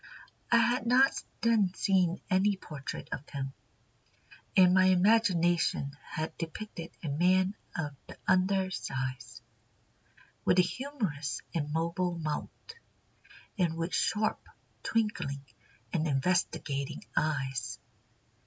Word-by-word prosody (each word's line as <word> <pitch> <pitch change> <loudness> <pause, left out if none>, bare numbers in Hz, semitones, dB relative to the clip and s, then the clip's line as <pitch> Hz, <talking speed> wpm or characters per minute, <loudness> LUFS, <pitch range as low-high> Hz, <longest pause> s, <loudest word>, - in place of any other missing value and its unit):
I 235 - +7
had 240 0 +2
not 260 +3 +6 0.3
then 215 -5 +3
seen 185 -2 +2
any 195 +1 +3
portrait 145 -8 -7
of 145 - -5
him, 135 -2 -4 1.0
and 180 -1 +7
my 185 0 +6
imagination 180 -7 +3
had 155 +1 -5
depicted 170 0 -6
a - - -3
man 185 +6 +3 0.2
of 145 -4 -3
the - - -11
under 185 +1 +3
size, 130 -6 -4 1.0
with - - +3
a 180 - +7
humorous 195 - -3
and 150 -3 -2
mobile 170 +2 0
mouth, 155 -2 -2 1.1
and 165 -3 +1
with 165 +2 -2
sharp, 215 0 +1 0.4
twinkling, 175 -11 -1 0.5
and 160 0 +1
investigating 140 -2 0
eyes. 135 -5 -1
175 Hz, 105 wpm, -31 LUFS, 150-195 Hz, 1.1 s, I